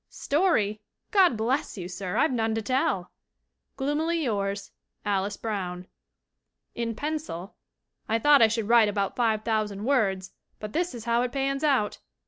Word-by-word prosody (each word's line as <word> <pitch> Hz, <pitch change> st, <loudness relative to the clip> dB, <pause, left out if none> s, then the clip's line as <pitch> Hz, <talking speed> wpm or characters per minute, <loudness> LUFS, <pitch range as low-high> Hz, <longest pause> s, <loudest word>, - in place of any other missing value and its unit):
'Story? 250 Hz, -, +1 dB, 0.3 s
God 375 Hz, -, +5 dB
bless 235 Hz, +2 st, -1 dB
you, 175 Hz, -2 st, -5 dB
sir, 185 Hz, 0 st, -4 dB
I've 315 Hz, -, +3 dB
none 225 Hz, -3 st, 0 dB
to 225 Hz, -, -1 dB
tell!' 205 Hz, -7 st, 0 dB, 0.7 s
"Gloomily 310 Hz, +4 st, 0 dB
yours, 200 Hz, -4 st, -2 dB, 0.3 s
"ALICE 200 Hz, 0 st, 0 dB
BROWN." 185 Hz, -5 st, -4 dB, 0.9 s
[In 230 Hz, -1 st, -3 dB
pencil] 290 Hz, -, -4 dB, 0.5 s
"I 225 Hz, -, +3 dB
thought 290 Hz, +3 st, +5 dB
I 225 Hz, -, +8 dB
should 220 Hz, -1 st, -2 dB
write 230 Hz, -2 st, +6 dB
about 200 Hz, -1 st, -1 dB
five 220 Hz, -3 st, +1 dB
thousand 215 Hz, -2 st, -1 dB
words, 195 Hz, -9 st, +1 dB, 0.3 s
but 210 Hz, 0 st, -7 dB
this 345 Hz, -5 st, -1 dB
is 230 Hz, -, -8 dB
how 235 Hz, 0 st, +2 dB
it 250 Hz, 0 st, -1 dB
pans 275 Hz, +1 st, -1 dB
out!" 265 Hz, -9 st, +1 dB
225 Hz, 150 wpm, -27 LUFS, 200-275 Hz, 0.9 s, I